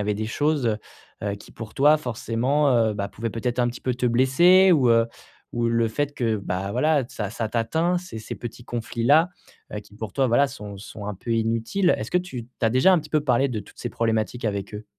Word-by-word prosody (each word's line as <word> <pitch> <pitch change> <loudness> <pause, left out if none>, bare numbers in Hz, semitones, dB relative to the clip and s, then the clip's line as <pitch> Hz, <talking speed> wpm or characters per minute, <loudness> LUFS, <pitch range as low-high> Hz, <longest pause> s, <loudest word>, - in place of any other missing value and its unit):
avait 105 0 0
des 110 +1 -3
choses, 145 +3 0
heu 110 -2 +1 0.4
heu, 100 -1 -1
qui - - -15
pour 110 -1 -9
toi, 150 +2 +5
forcément, 125 +2 0
heu, 115 -2 +3
ben 100 -1 -3
pouvaient 110 +3 -5
peut-être 120 +3 -2
un 120 - +2
petit 120 - -7
peu 125 -2 -1
te 125 0 -1
blesser? 170 +10 +5
Ou, 135 -6 +4
heu, 115 0 +4 0.5
ou 120 0 0
le 115 -1 +2
fait 145 +6 -2
que, 115 -5 0
bah, 95 0 -3
voilà, 145 +2 +2
ça 105 -3 -4
ça 110 0 -3
t'atteint 160 +11 0
ces 180 -11 -8
ces 110 - -6
petits 120 0 -8
conflits-là, 120 +8 +2 0.4
heu, 105 - -3
qui 105 0 -19
pour 110 -3 -6
toi, 135 - +2
voilà 135 +4 +4
sont 105 -7 -8
sont 105 +1 -9
un 105 - -3
peu 110 +5 -8
inutiles. 115 - +1
Est-ce - - -5
que 180 - +3
tu 135 -10 -6
tu 125 - -26 0.2
as 110 - +2
déjà 130 +10 +5
un 180 - +5
petit 155 - -12
peu 155 - +2
parlé 135 0 +2
de 115 -4 -3
toutes 100 - -16
ces 120 - -4
problématiques 115 +1 -1
avec 100 -1 -3
eux? 105 +1 -7
120 Hz, 235 wpm, -24 LUFS, 110-140 Hz, 0.5 s, toi